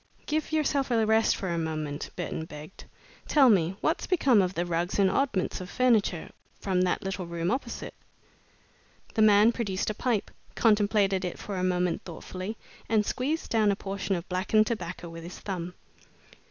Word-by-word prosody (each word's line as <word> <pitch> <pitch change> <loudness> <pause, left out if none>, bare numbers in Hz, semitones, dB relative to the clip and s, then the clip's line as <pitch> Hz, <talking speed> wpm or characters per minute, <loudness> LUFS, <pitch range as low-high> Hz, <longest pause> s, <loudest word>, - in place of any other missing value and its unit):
"Give 310 +1 -1
yourself 285 -3 +1
a 225 -2 +2
rest 220 +1 +3
for 190 - -4
a 170 -1 -1
moment," 155 -3 -3
Burton 165 -2 -4
begged. 150 +3 -11 0.4
"Tell 275 -5 +6
me, 180 -2 +2
what's 320 - 0
become 275 - +4
of 185 0 -1
the 175 - 0
rugs 175 +1 -1
and 195 -2 +4
oddments 200 -8 0
of 180 - -7
furniture 220 -9 +1 0.3
from 185 -2 0
that 180 -1 0
little 190 -2 -4
room 170 +1 -2
opposite?" 260 - -4 1.2
The 220 - +1
man 215 +1 +6
produced 205 -4 -2
a - - -4
pipe, 230 -1 -1 0.2
contemplated 205 -3 +3
it 180 - -3
for 200 - -6
a 185 - -2
moment 180 -1 0
thoughtfully, 185 +4 -7 0.3
and 215 -1 +3
squeezed 290 +9 -2
down 220 -2 +3
a - - 0
portion 195 0 -3
of 170 +1 -5
blackened 195 +4 +2
tobacco 180 -6 -4
with 165 0 -9
his 175 +2 -8
thumb. 180 -3 -5
195 Hz, 170 wpm, -28 LUFS, 180-225 Hz, 1.2 s, Tell